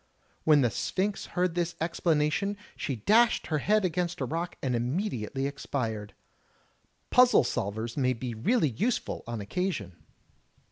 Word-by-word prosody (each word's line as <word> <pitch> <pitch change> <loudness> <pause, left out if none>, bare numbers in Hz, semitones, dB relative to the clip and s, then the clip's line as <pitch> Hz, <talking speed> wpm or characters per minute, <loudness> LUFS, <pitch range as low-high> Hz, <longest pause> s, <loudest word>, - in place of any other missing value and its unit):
When 150 -2 +6
the 120 -3 +2
Sphinx 195 - -2
heard 180 -1 +2
this 175 0 -1
explanation, 165 +3 +1 0.2
she 135 - -3
dashed 220 - +3
her 155 -2 0
head 210 +6 +2
against 175 0 -1
a - - 0
rock 170 +3 -3
and 130 -3 +1
immediately 135 - -2
expired. 115 -7 -3 1.0
Puzzle 250 - +6
solvers 110 0 -3
may 130 -3 +2
be 120 0 -5
really 155 - +2
useful 215 - -1
on 120 -2 -4
occasion. 100 - -3
150 Hz, 135 wpm, -29 LUFS, 120-185 Hz, 1.0 s, When